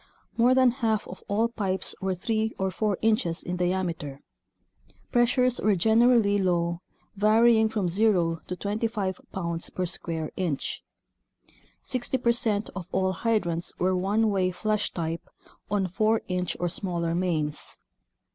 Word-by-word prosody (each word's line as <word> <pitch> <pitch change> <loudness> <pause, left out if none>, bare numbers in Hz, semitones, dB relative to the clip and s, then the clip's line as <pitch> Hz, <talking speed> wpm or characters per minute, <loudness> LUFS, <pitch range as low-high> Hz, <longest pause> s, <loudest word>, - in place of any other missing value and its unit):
More 245 +2 +4
than 255 -1 +5
half 225 -4 -1
of - - -9
all 215 +3 +2
pipes 195 -5 -2
were 190 -1 0
three 220 +4 -1
or 190 0 -1
four 205 +1 0
inches 215 -7 +1
in 175 - -3
diameter. 175 -6 -2 0.9
Pressures 245 0 +2
were 210 -1 +3
generally 220 +1 +4
low, 170 -2 0 0.4
varying 220 +2 +4
from 210 -4 -1
zero 175 -3 +2
to 180 - -3
25 205 -1 -2
pounds 170 -3 -3
per 185 - -2
square 165 -3 -4
inch. 165 -7 -2 1.0
Sixty 255 +1 -1
percent 230 -4 +1
of 185 -2 -6
all 190 0 +1
hydrants 180 -4 -1
were 185 +1 +1
one 205 +4 +1
way 190 -2 +1
flush 215 +3 -1
type 165 -1 -4 0.4
on 200 -1 +1
4 215 +4 +1
inch 180 -1 -2
or 175 - 0
smaller 170 -2 -2
mains. 165 -4 -2
195 Hz, 135 wpm, -27 LUFS, 175-220 Hz, 1.0 s, than